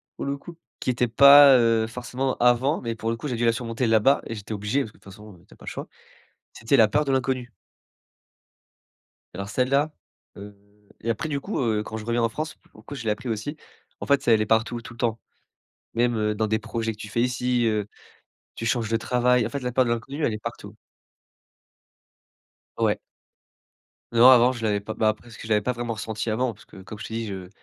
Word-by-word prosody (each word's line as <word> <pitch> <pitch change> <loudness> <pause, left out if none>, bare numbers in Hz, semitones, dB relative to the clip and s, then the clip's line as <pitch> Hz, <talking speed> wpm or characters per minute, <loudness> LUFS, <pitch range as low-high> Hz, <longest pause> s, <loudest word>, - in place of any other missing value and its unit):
pour - - -5
le 140 0 -2
coup, 170 +4 -12 0.2
qui - - 0
était 125 0 0
pas, 140 +2 +8
heu, 115 -2 +2
forcément 125 +3 -3
avant, 125 +5 +3
mais 115 -2 -3
pour 115 0 -4
le 115 - -1
coup, 150 - -5
j'ai 125 - -2
dû 120 - 0
la 115 - +5
surmonter 115 +1 -2
là-bas 115 +5 +4
et 115 - -5
j'étais 105 +1 -7
obligé, 105 +7 -1
parce 110 - -6
que - - -23
de - - -29
toute 100 - -13
façon, 105 -3 -14
tu - - -18
as - - -20
pas - - -15
le - - -4
choix. - - -7 0.7
C'était 115 +5 +1
la 110 - +6
peur 150 +8 +1
de 140 - -3
l'inconnu 130 -2 -1 1.8
alors 100 +2 -5
celle-là 140 +5 +1 0.5
heu 100 +1 -10 0.5
et 115 - -1
après 115 +7 -2
du 140 - -1
coup, 200 +9 -3
heu, 110 -4 0
quand 110 - -7
je 110 - -8
reviens 120 0 0
en 115 - +2
France, 155 +7 -5
pour - - -24
le - - -19
coup 145 - -9
je 135 -4 -7
l'ai 110 - 0
appris 120 +4 -3
aussi. 115 +7 -3 0.4
En - - -5
fait, 140 -1 +3
c'est 120 - +3
elle 110 - +2
est - - -2
partout, 110 +2 +1
tout 115 0 -11
le - - -18
temps. 115 -2 -1 0.7
Même, 120 +1 +1
heu, 105 0 0
dans 110 +1 0
des 110 +1 0
projets 115 0 -3
que - - -18
tu 105 - -8
fais 115 +3 0
ici, 125 0 0
heu, 105 -2 0 0.7
tu 115 - -5
changes 115 -2 0
de 115 - +1
travail. 125 0 +2
En - - -3
fait, 140 - -4
la 125 0 -3
peur 130 - +4
de - - -2
l'inconnu, 135 +6 -3
elle 110 - 0
est - - -3
partout. - - -8 2.0
Ouais. - - +1 1.1
Non 120 +2 +7
avant 125 0 +6
je 115 -3 -8
l'avais 105 -2 +1
pas. 110 +2 -6
Bah 110 - +2
après 110 +2 -3
c'est 115 - -12
que - - -9
je - - -9
l'avais 105 -1 +3
pas 125 - 0
vraiment 120 -1 -4
ressentie 110 +1 -4
avant 120 +3 0
parce 100 - -18
que - - -17
comme 105 +3 -10
je - - -8
t'ai 110 - -7
dis 115 0 -3
je 95 -3 -7
115 Hz, 240 wpm, -24 LUFS, 110-125 Hz, 2.0 s, pas